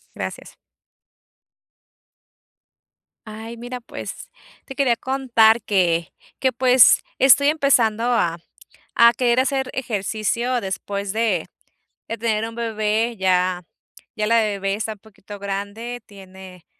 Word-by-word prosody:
Gracias. - - -7 2.7
Ay, 225 +2 -8
mira, 245 +1 -7
pues 255 - -9 0.3
te 270 - -9
quería 260 -3 +2
contar 235 -3 +2
que 175 -5 0 0.3
que 260 -1 +1
pues 250 0 +5 0.2
estoy 280 +2 +6
empezando 245 -7 +2
a 175 -9 +1 0.6
a 235 0 +7
querer 240 +1 +2
hacer 265 -1 -1
ejercicio 230 +1 -2
después 200 +1 -4
de 215 -6 0 0.6
de 230 - -4
tener 225 -1 -1
un 230 - -10
bebé. 225 0 -1
Ya 185 -1 +1 0.5
ya 215 -2 -1
la 230 +1 +4
bebé 200 -2 -1
está 220 +1 -4
un 210 - -20
poquito 205 -1 -13
grande, 200 +5 -5
tiene 190 -3 -14
225 Hz, 115 wpm, -21 LUFS, 200-245 Hz, 2.7 s, a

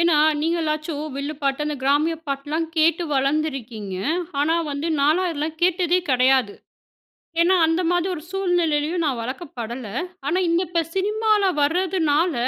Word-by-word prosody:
ஏன்னா 335 -2 +4 0.2
நீங்களாச்சும் 310 -2 -1
வில்லு 285 +2 -3
பாட்டு 275 +1 0
அந்த 300 - -2
கிராமிய 290 +4 +2
பாட்டுலா 280 +2 -3 0.2
கேட்டு 325 +2 +3
வளர்ந்துருக்கீங்க. 265 -8 -1 0.5
ஆனா 310 +3 +2 0.2
வந்து 285 +3 -3
நாலாம் 320 +6 +3
இதெல்லாம் 315 0 -4
கேட்டதே 355 0 +3
கெடையாது. 255 -4 +3 0.9
ஏன்னா 365 +2 +4
அந்த 325 +2 +1
மாரி 350 0 +1
ஒரு 325 - -6
சூழ்நிலையிலேயும் 345 -4 0
நான் 260 -5 -1
வளக்கப்படல. 245 -2 -6 0.4
ஆனா 325 +5 +1
இந்த 335 +1 +2
இப்ப 340 0 0
சினிமால 425 +2 +2 0.2
வரதுனால 330 0 +1
310 Hz, 130 wpm, -22 LUFS, 280-345 Hz, 0.9 s, ஏன்னா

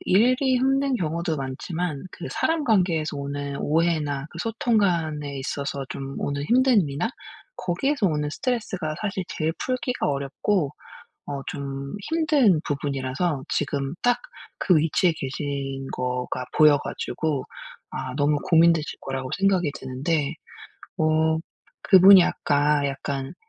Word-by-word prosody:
일이 255 +6 +3
힘든 270 +1 +2
경우도 165 -2 -2
많지만 145 +3 -4
그 175 - -8
사람 325 -2 0
관계에서 175 - +1
오는 140 0 -4
오해나 150 -3 0
그 170 - -10
소통 225 +3 0
간에 155 -8 0
있어서 140 +1 -3
좀 135 0 -6
오는 140 0 -2
힘든 245 - +4
일이나 145 +9 -2 0.5
거기에서 215 +6 0
오는 150 -3 0
스트레스가 195 - -2
사실 195 -3 -2
제일 155 0 -1
풀기가 255 0 -2
어렵고 140 +4 -1 0.5
어 140 -1 -4
좀 140 0 -5
힘든 300 - +3
부분이라서 140 +1 -2
지금 140 -1 -1
딱 245 0 +3 0.4
그 180 - +4
위치에 165 +3 +3
계신 135 -1 -4
거가 125 0 -3
보여 150 -1 +7
가지고 150 -2 -3 0.5
아 130 -1 -5
너무 145 +1 +2
고민되실 165 -2 +3
거라고 130 -1 -4
생각이 190 -6 +2
드는데 140 +4 -2 0.6
어 160 0 +2 0.4
그분이 190 -1 +8
아까 145 0 +1
약간 135 -1 -4
155 Hz, 275 characters per minute, -24 LUFS, 140-190 Hz, 0.6 s, 그분이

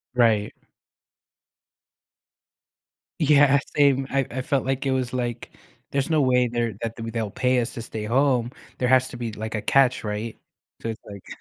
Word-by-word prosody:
Right. 110 -4 +3 2.7
Yeah, 140 -2 +5 0.2
same. 140 -2 +3
I 135 -1 +1
I 130 +1 -3
felt 135 0 0
like 135 +1 -1
it 135 - +1
was, 130 -2 -1
like, 120 -2 -4 0.4
"There's 140 +2 0
no 155 -2 +3
way 125 -1 +3
they're 120 -2 -1
that 115 -1 -3
they'll 115 -2 -4
pay 125 +2 +1
us 120 - -2
to 115 - -6
stay 110 -1 -6
home. 125 0 +2 0.3
There 125 - 0
has 130 0 +4
to 120 - -9
be, 115 -2 -4
like, 110 +2 -5
a 110 - -2
catch, 130 -1 +3
right?" 105 +2 -4 0.4
So - - -4
it's 110 - -6
like 100 -2 -11
125 Hz, 170 wpm, -24 LUFS, 115-135 Hz, 2.7 s, Yeah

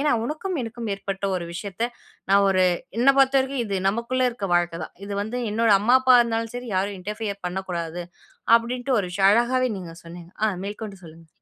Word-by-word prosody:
ஏன்னா 295 +1 +2
உனக்கும், 315 +8 -3
எனக்கும் 230 -1 -5
ஏற்பட்ட 195 0 -5
ஒரு 175 -1 -4
விஷயத்தை 200 +5 -3 0.4
நான் 200 0 +5
ஒரு 185 -1 +3 0.3
என்னைப் 275 +3 +4
பொறுத்தவரைக்கும் 265 -1 +2
இது 195 -2 -1
நமக்குள்ள 235 +5 -1
இருக்கற 205 -6 -5
வாழ்க்கைதான். 175 -2 -1
இது 205 - -5
வந்து 220 +4 -4
என்னோட 225 +1 +2
அம்மா, 240 +5 +5
அப்பா 255 -1 +7
இருந்தாலும் 230 0 -3
சரி 245 0 -6
யாரும் 200 +1 -1
இன்டெர்ஃப்பியர் 205 +1 -5
பண்ணக் 190 +2 -4
கூடாது 170 0 -3 0.5
அப்படின்டு 245 +3 -2
ஒரு 190 - -4
விஷயம். 195 +1 +4
அழகாகவே 245 +3 +2
நீங்கச் 170 -2 -10
சொன்னீங்க. 170 0 -11
ஆ - - +5 0.2
மேற்கொண்டு 205 0 -6
சொல்லுங்க. 165 0 -14
210 Hz, 180 wpm, -24 LUFS, 185-245 Hz, 0.5 s, அப்பா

